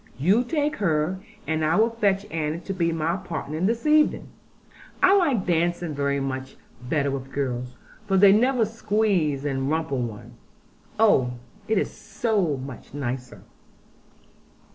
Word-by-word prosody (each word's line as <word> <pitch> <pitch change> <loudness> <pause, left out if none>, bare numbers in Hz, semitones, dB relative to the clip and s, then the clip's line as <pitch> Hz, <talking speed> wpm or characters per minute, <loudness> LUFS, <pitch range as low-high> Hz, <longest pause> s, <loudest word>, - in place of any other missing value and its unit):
You 195 - +3
take 300 +2 -1
her; 170 -1 0 0.3
and 160 0 -1
I 155 +2 +2
will 225 +3 +3
fetch 205 -3 +1
Annie 160 +1 -2
to 195 - -4
be 170 -3 0
my 165 +2 -1
partner 160 -4 -5
this 225 - 0
evening. 305 0 +3 0.7
I 375 +2 +7
like 290 - +2
dancing 175 -1 0
very 140 0 0
much 130 -1 -4 0.2
better 140 +2 0
with 135 0 -5
girls, 125 -2 -3 0.3
for 195 -1 +2
they 195 +1 +8
never 240 +3 +3
squeeze 205 -10 0
and 135 -1 -1
rumple 155 -4 -1
one. 110 -4 -6 0.7
Oh, 130 - +4 0.3
it 220 -1 +1
is - - 0
so 200 - -1
much 130 +1 -9
nicer!' 125 -2 -5
165 Hz, 140 wpm, -25 LUFS, 140-210 Hz, 0.7 s, they